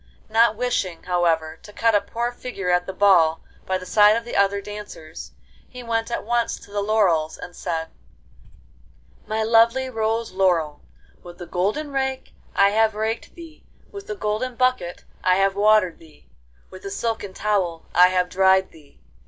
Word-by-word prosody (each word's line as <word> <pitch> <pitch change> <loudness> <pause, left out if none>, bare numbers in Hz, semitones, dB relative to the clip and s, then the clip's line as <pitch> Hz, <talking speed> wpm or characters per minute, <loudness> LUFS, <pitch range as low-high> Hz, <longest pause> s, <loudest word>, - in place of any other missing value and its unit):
Not 225 0 +4
wishing, 210 -8 -2
however, 165 -3 0
to 210 - -13
cut 230 +2 +1
a 205 - +4
poor 235 +4 -3
figure 220 -7 -4
at 180 0 +1
the - - -3
ball 180 -5 +3 0.2
by 185 - 0
the 185 - -10
side 210 +3 +5
of 230 0 -3
the 240 - -6
other 200 0 +2
dancers, 205 -6 -9 0.4
he 250 -1 -10
went 225 -1 -2
at 235 - -3
once 235 +1 0
to 205 - -16
the 205 0 -2
laurels, 190 -7 +1
and 175 0 -10
said: 165 -2 -4 1.4
'My 220 0 -1
lovely 230 +4 +3
rose 225 0 -1
laurel, 175 -6 0 0.4
with 175 0 -12
the 175 - -8
golden 210 - -2
rake 265 -1 -3 0.2
I 200 0 +5
have 220 +1 +2
raked 220 +2 -3
thee, 330 -2 -13 0.3
with 400 -1 -9
the 210 - -4
golden 215 +5 -3
bucket 255 -8 0 0.2
I 185 0 +4
have 195 0 +2
watered 210 -3 +3
thee, 160 -2 -20 0.4
with 185 - -12
a 195 - -5
silken 205 -2 -4
towel 190 -6 -1
I 180 +1 +7
have 180 -1 +1
dried 190 +1 +3
thee. 150 - -20
205 Hz, 170 wpm, -22 LUFS, 180-225 Hz, 1.4 s, I